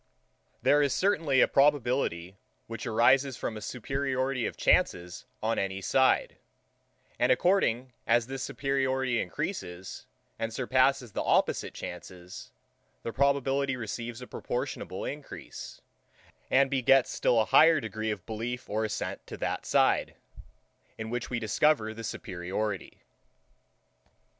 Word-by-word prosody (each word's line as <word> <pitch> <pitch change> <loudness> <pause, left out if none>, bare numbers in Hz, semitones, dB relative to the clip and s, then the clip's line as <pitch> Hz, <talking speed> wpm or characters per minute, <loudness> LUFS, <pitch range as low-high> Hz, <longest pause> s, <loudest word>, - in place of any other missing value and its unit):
There 145 +1 +5
is 140 -3 +1
certainly 160 -9 +2
a - - +6
probability, 125 - +1 0.3
which 115 +1 -6
arises 130 +4 +3
from 110 - -4
a 110 - -7
superiority 130 +2 -2
of - - -7
chances 90 +1 +1 0.2
on 115 +1 +1
any 95 0 -2
side; 130 +6 +2 0.8
and - - +3
according 130 - +2
as 120 -1 +3
this 135 +2 -6
superiority 130 -2 0
encreases, 95 - -5 0.3
and 115 0 -2
surpasses 130 0 +1
the - - -2
opposite - - +1
chances, 90 +1 -9 0.5
the 115 - -4
probability 140 0 +1
receives 120 +1 -5
a - - -7
proportionable - - -4
encrease, - - -8 0.7
and 135 +1 +4
begets 135 0 +4
still 120 - +2
a 110 - +3
higher 160 +7 +6
degree 110 -2 -4
of 105 -5 -4
belief 120 +3 -5
or 110 +1 -1
assent 110 - -4
to - - -7
that - - -3
side, - - +2 0.8
in 110 0 -5
which 120 -1 -3
we 125 - -1
discover 110 +1 +2
the 115 +1 -8
superiority. 95 0 -4
125 Hz, 125 wpm, -29 LUFS, 110-135 Hz, 0.8 s, a